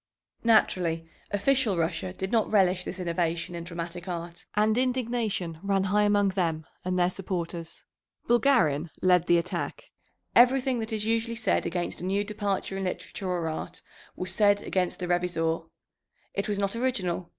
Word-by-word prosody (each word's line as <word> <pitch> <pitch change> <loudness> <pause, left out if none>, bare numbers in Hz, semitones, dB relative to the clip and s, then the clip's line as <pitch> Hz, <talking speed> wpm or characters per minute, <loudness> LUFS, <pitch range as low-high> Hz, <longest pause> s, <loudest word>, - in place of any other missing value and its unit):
Naturally 175 -7 +3 0.2
official 215 0 +2
Russia 165 +2 -1
did 190 +1 -4
not 225 -2 +2
relish 185 -3 +3
this 190 - -6
innovation 170 0 -1
in 170 -1 -5
dramatic 170 +1 -6
art, 170 -1 -6
and 215 +1 +3
indignation 235 -9 -1
ran 195 -1 +1
high 200 +2 +2
among 205 -1 +3
them 165 -5 -1 0.2
and 185 0 -1
their 175 -1 +4
supporters. 175 -3 -5 0.4
Bulgarin 175 - +3
led 180 -2 +4
the 175 - +5
attack. 180 - -3 0.4
Everything 255 +1 +5
that 220 0 -3
is 215 -1 -1
usually 230 +1 0
said 230 -6 +1
against 175 0 -3
a - - -4
new 195 +2 +1
departure 205 -2 -2
in 195 0 -2
literature 185 +1 -4
or 175 -2 -1
art 160 - -5 0.3
was 185 0 -3
said 205 0 +4
against 185 -2 -1
the 180 - -4
Revizor. 165 -2 0 0.6
It 200 +1 -2
was 205 - 0
not 200 +1 0
original. 195 -9 -1
185 Hz, 160 wpm, -28 LUFS, 175-215 Hz, 0.6 s, the